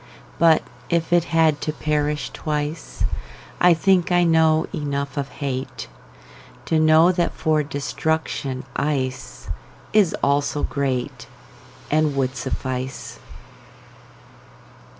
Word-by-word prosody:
But 165 -2 +5 0.3
if 170 0 0
it 175 -1 +4
had 160 -3 +2
to 155 - -1
perish 150 0 -1
twice,I 150 - -1
think 180 +1 +2
I 175 0 +4
know 160 -1 +4
enough 140 -3 -3
of 140 -1 -3
hateTo 130 - -4 0.9
know 155 +3 +6
that 175 -2 0
for 155 -1 +1
destruction 145 -1 -2
iceIs 130 - -3 0.7
also 145 +1 +1
greatAnd 140 - -3
would 135 -1 0
suffice. 130 +1 -4
150 Hz, 90 wpm, -22 LUFS, 135-160 Hz, 0.9 s, know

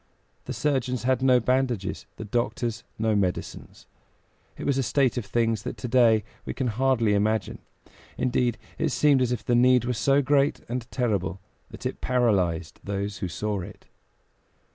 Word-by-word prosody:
The - - -4
surgeons 130 -4 -1
had 130 0 +1
no 130 -1 +5
bandages, 125 -5 -1
the 110 - -7
doctors 120 +1 -2
no 110 -1 +1
medicines; 95 -3 -3 0.7
it - - -6
was 140 -1 +1
a - - +3
state 135 0 +1
of 120 -5 -4
things 115 -3 +1
that - - -6
to 125 - -5
day 115 -3 +4 0.2
we - - -5
can 130 -3 -1
hardly 115 -2 +2
imagine. 105 0 0 0.6
Indeed, 125 -1 +1 0.2
it - - +1
seemed 145 -3 +3
as 125 -1 +1
if 115 -3 -3
the 120 - +1
need 125 0 +5
were 125 - 0
so 135 +6 +2
great 140 +1 +2
and 120 0 -4
terrible 100 -7 -1 0.3
that - - -11
it - - -3
paralyzed 95 -10 +1
those 100 0 -3
who 95 - -2
saw 105 +4 -3
it. - - -11
120 Hz, 165 wpm, -26 LUFS, 105-130 Hz, 0.7 s, no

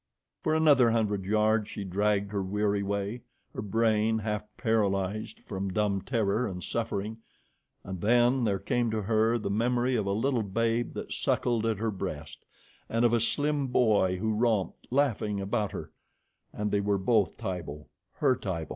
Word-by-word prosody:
For 155 - +1
another 145 -6 +5
hundred 105 -4 0
yards 105 +1 +2
she 100 - -5
dragged 100 +1 0
her 100 -2 -1
weary 100 +1 0
way, 100 +4 -2 0.3
her - - -4
brain 110 +1 +2
half 105 -1 -3
paralyzed 105 -2 0
from 95 -1 -4
dumb 100 0 0
terror 115 0 0
and 90 -3 -6
suffering, 110 -1 -3 0.6
and 95 -2 -6
then 120 +4 +3
there 100 -3 +1
came 115 +5 0
to 110 -1 -2
her 110 +2 +2
the 100 -3 -3
memory 120 +4 +1
of 105 -4 0
a - - +1
little 120 +4 +1
babe 115 +3 0
that - - -5
suckled 115 -2 0
at 110 -2 0
her 110 +1 -1
breast, 90 -6 -6 0.4
and 115 +1 +2
of 120 - +3
a 120 - +4
slim 145 +4 0
boy 105 -7 +3
who 110 +3 -1
romped, 105 -5 0
laughing, 115 -6 +1
about 100 +1 -1
her, - - -7 0.6
and 105 0 -3
they 100 - +2
were 100 0 +1
both 100 +1 +1
Tibo 85 -8 -5 0.3
her 130 - +2
Tibo! 95 -9 -4
105 Hz, 165 wpm, -29 LUFS, 100-115 Hz, 0.6 s, another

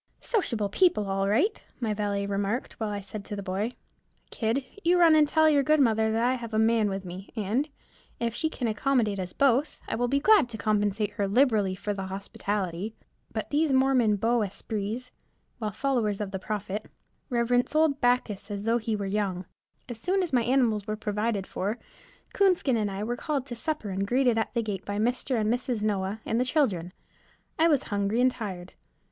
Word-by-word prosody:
"Sociable 235 - 0
people 215 - +3
all 195 0 0
right," 330 - +2 0.2
my 225 -4 0
valet 205 -1 -1
remarked, 200 +4 -2
while 220 -2 -1
I 205 -1 -3
said 200 +1 -7
to 205 - -5
the 200 - -5
boy, 200 +5 -2 0.6
"Kid, 235 +4 -1 0.2
you 350 +2 +4
run 335 -2 +7
and 305 -1 +5
tell 315 +1 +4
your 295 -2 +4
good 305 +3 +3
mother 220 -4 +3
that 225 +1 +1
I 250 - +3
have 230 -3 -5
a - - +2
man 220 -1 +3
with 195 0 -4
me, 185 +2 -8
and, 225 +8 0 0.5
if 235 -1 -1
she 315 +6 -1
can 250 -6 -3
accommodate 220 -2 +1
us 180 -1 -4
both, 275 +2 +2
I - - -3
will 245 +1 0
be 275 +3 +2
glad 400 - +5
to 225 - -6
compensate 210 0 0
her 205 -1 -1
liberally 210 -4 +3
for 205 +2 -3
the 195 -1 -5
hospitality." 195 0 -3 0.4
But - - -4
these 300 0 +2
Mormon 260 -5 +4
beaux 230 +3 +1
esprits, 215 +4 -4 0.5
while 215 -2 -1
followers 225 -3 0
of 205 -2 -3
the 190 - -3
Prophet, 210 +1 -4 0.4
reverence 245 +2 +1
old 310 -3 +3
Bacchus 245 -5 +1
as 200 -1 -4
though 230 +2 +2
he 220 -1 -2
were 200 -1 -3
Young. 195 -2 -1 0.4
As 240 -3 -7
soon 375 +5 +1
as 345 - -4
my 245 - +4
animals 235 -4 +1
were 215 - -1
provided 210 -1 -1
for, 205 +5 -3 0.6
Coonskin 365 -10 +3
and 215 -2 0
I 195 +1 -4
were 240 +3 -2
called 280 0 -2
to 250 -3 -6
supper 265 -5 -3
and 195 +1 -2
greeted 245 -1 +3
at 225 - -3
the 235 - +1
gate 205 -3 -4
by 205 0 -4
Mr. 245 +2 0
and 215 +1 +2
Mrs. 245 -3 -2
Noah 205 0 -1
and 225 - 0
the - - +3
children. 225 - 0 0.7
I 325 - +6
was 295 -5 +3
hungry 200 +3 0
and 255 +1 +4
tired. 185 -7 -6
220 Hz, 200 wpm, -27 LUFS, 205-255 Hz, 0.7 s, run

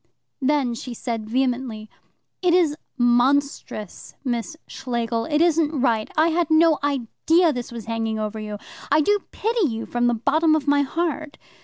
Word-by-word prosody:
Then 270 -3 +1
she 240 +1 -7
said 225 -3 -4
vehemently: 245 -3 -1 0.5
"It 355 -1 +3
is 330 -5 +3 0.2
monstrous, 245 -4 0
Miss 245 +5 -2
Schlegel; 235 -2 -3
it 300 0 +1
isn't 325 -3 +2
right. 230 -4 +1
I 315 +2 +4
had 335 -1 0
no 315 -1 +4
idea 290 +5 +1
that - - 0
this 245 -2 -5
was 235 -2 -7
hanging 225 -1 -2
over 215 0 -3
you. 210 -1 -5 0.3
I 300 +2 +5
do 410 +7 +2
pity 445 -3 0
you 225 -3 -4
from 240 0 0
the 240 - +2
bottom 310 +7 +2
of 300 -2 -2
my 285 0 +4
heart. 310 0 -2
270 Hz, 165 wpm, -23 LUFS, 230-315 Hz, 0.5 s, I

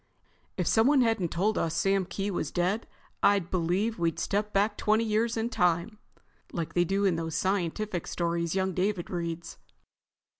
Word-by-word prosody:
"If - - 0
someone 260 +5 +4
hadn't 225 -7 +1
told 205 +7 0
us 165 0 -1
Sam 195 0 +2
Kee 195 +2 -3
was 180 - -2
dead, 185 +5 -1 0.3
I'd 200 -4 +3
believe 185 +5 0
we'd 165 -1 0
stepped 210 +1 -1
back 205 +2 +2
twenty 215 +2 +2
years 225 +1 0
in 225 +1 -1
time, 180 0 0 0.5
like 165 -2 -4
they 175 - +3
do 195 +3 0
in 180 -4 +2
those 165 -1 -3
scientific 190 0 -1
stories 170 0 -1
young 190 -1 0
David 185 0 -1
reads." 170 -1 -4
190 Hz, 160 wpm, -28 LUFS, 170-215 Hz, 0.5 s, someone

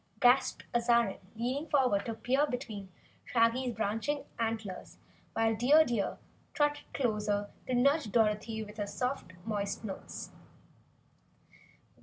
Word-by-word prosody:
gasped 250 +2 +4
Azarine 235 -3 +3 0.2
leaning 260 +7 -2
forward 250 -8 +2
to 230 - -2
peer 265 +6 +2
between 215 -7 -5 0.3
Shaggy's 235 +1 +2
branching 225 +7 -1
antlers, 220 -5 -3 0.4
while 225 0 +2
Dear 285 +8 +6
Deer 230 -7 -1 0.4
trotted 295 0 0
closer 210 -5 0 0.2
to 255 - 0
nudge 280 -1 +3
Dorothy 220 0 +1
with 210 0 -11
her 205 -1 -2
soft, 250 -6 -3
moist 205 -1 -2
nose. 200 -3 -6
230 Hz, 115 wpm, -32 LUFS, 210-255 Hz, 0.4 s, Dear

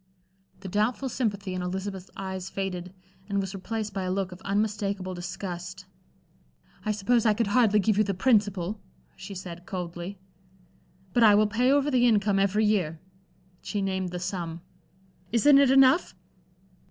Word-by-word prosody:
The 195 - -7
doubtful 215 +7 0
sympathy 205 -6 -2
in 185 - -3
Elizabeth's 190 +1 -5
eyes 190 -1 -5
faded, 185 -2 -4 0.4
and 200 0 0
was 195 0 -3
replaced 215 +2 -4
by 195 - -2
a 185 - -2
look 190 -1 -1
of 180 - -11
unmistakable 200 -2 -1
disgust. 180 +1 -6 1.0
"I 215 - 0
suppose 215 +3 +2
I 215 -2 +3
could 230 - +1
hardly 215 0 +3
give 210 0 +2
you - - +5
the 200 -2 -2
principal," 205 -3 +1 0.3
she 190 +1 -9
said, 175 -1 -8
coldly. 180 0 -5 1.0
"But 240 - +3
I 215 -2 +7
will 215 +1 +5
pay 235 +5 +2
over 285 +1 +2
the 245 -2 +4
income 205 -3 +3
every 200 +2 +2
year." 180 -7 0 0.6
She 205 - -3
named 190 -2 -1
the 180 - -5
sum. 175 -2 -4 0.7
"Isn't 275 +5 +6
it 280 -2 +5
enough?" 270 +5 +5
200 Hz, 155 wpm, -27 LUFS, 185-215 Hz, 1.0 s, I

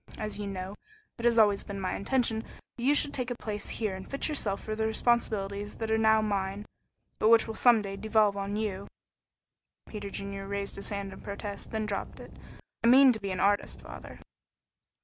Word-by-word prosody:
As 215 -1 -3
you 205 - -3
know, 190 0 -5 0.5
it 235 - -3
has 235 -1 +4
always 205 -3 +5
been 200 -1 -6
my 185 -1 -2
intention 225 0 0 0.3
that 240 - -9
you 285 +3 +4
should 290 - +1
take 250 -2 -2
a 245 - -2
place 210 -3 -5
here 215 -4 -2
and 190 - -9
fit 275 - -1
yourself 220 -10 -1
for 215 - -3
the 220 0 0
responsibilities 205 -3 0
that 225 -1 -3
are 220 - +3
now 220 0 +4
mine, 200 -1 -2 0.5
but 215 - +4
which 230 0 +7
will 225 - -5
some 230 -1 +5
day 195 -1 -5
devolve 215 -1 +2
on 200 0 -3
you." 200 -2 -3 1.0
Peter 205 -2 -6
Junior 195 0 -6
raised 200 0 -3
his 200 - -4
hand 200 -1 -4
in - - -11
protest, 200 0 -6
then 220 -1 -2
dropped 205 -2 -4
it. - - -11 0.5
"I - - +4
mean 260 +2 +8
to 220 - -3
be 200 - -3
an 185 - -3
artist, 205 +1 +1
father." - - -10
210 Hz, 205 wpm, -29 LUFS, 200-225 Hz, 1.0 s, mean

